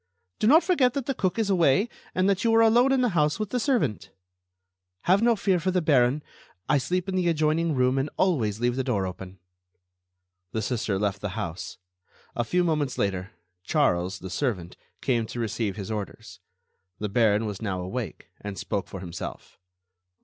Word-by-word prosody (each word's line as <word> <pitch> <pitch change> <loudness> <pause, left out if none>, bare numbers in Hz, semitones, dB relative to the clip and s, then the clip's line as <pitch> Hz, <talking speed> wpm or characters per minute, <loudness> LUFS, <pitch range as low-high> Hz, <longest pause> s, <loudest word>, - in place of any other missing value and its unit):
"Do 215 - +2
not 315 +8 +7
forget 270 -9 +2
that 275 -3 -2
the 275 - -1
cook 185 -5 -1
is 215 -3 +1
away, 180 - +3 0.3
and 185 +1 +2
that 200 -1 +1
you 230 - +3
are 225 - +6
alone 240 +4 +5
in 265 -1 +3
the 245 - +3
house 150 -4 +1
with 215 -2 -4
the 250 - 0
servant." 140 - 0 0.9
"Have 190 +3 +3
no 235 0 +4
fear 190 -3 +1
for 185 - -1
the 185 0 +2
Baron. 140 -3 +3 0.4
I 145 0 +3
sleep 180 +6 -1
in 190 - -2
the 180 -2 +1
adjoining 160 0 +1
room 130 +1 +2
and 135 +3 -1
always 115 - +1
leave 120 0 +1
the 130 - 0
door 110 -7 0
open." 95 +1 -7 1.2
The 110 - -1
Sister 110 -3 -1
left 100 -1 -1
the 100 -3 -4
house. 85 +1 -5 0.6
A 120 - 0
few 180 +8 +1
moments 150 -6 0
later, 95 +1 -2 0.3
Charles, 95 - +1
the 95 0 -8
servant, 95 -5 -2 0.3
came 120 -4 0
to 120 - -6
receive 110 -3 -2
his 100 0 -6
orders. 105 -2 -6 0.6
The 105 - -3
Baron 110 0 +2
was 105 -2 -5
now 95 -4 -2
awake, 95 0 -5
and 100 -1 -6
spoke 100 0 -3
for 95 - -8
himself. 85 -2 -8
130 Hz, 185 wpm, -26 LUFS, -, 1.2 s, not